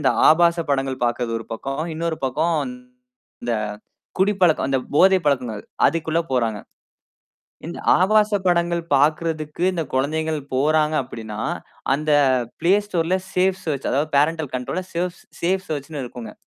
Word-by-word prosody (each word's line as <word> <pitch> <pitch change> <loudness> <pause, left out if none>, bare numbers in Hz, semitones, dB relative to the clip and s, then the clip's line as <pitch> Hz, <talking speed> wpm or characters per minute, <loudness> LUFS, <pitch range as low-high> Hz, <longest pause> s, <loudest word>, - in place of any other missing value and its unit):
இந்த 140 - +3 0.2
ஆபாச 170 +2 +5
படங்கள் 135 -2 -1
பார்க்குறது 120 -1 -1
ஒரு 115 - -10
பக்கம். 135 +5 -4
இன்னொரு 165 0 -2
பக்கம் 160 +6 0 0.9
இந்த 120 -1 -1 0.6
குடிப்பழக்கம் 190 -6 +3
அந்த 135 -1 +2 0.2
போதை 190 +4 +6
பழக்கங்கள் 125 -7 0 0.2
அதுக்குள்ள 165 0 0
போறாங்க. 115 -4 +1 1.1
இந்த 170 - -6 0.2
ஆபாச 210 +2 +3
படங்கள் 170 -1 +1
பாக்குறதுக்கு, 155 +2 0
இந்த 165 - -1
குழந்தைகள் 155 +4 0 0.2
போறாங்க 155 +2 +2
அப்படின்னா, 110 -3 -7 0.5
அந்த 155 +1 -1 0.5
Play 185 +4 +4
Storeல 180 -1 +1 0.2
சேஃப் 185 +1 +2
சேர்ச், 145 -4 -2
அதாவது 145 +4 0
பேரன்டல் 155 -1 +1
கண்ட்ரோல்ல, 130 +9 -3
சேவ்ஸ் 175 +1 -3 0.2
சேஃப் 190 +2 0
சேர்ச்சுன்னு 145 -1 -4
இருக்கும்ங்க. 120 -3 -9
155 Hz, 130 wpm, -22 LUFS, 135-170 Hz, 1.1 s, போதை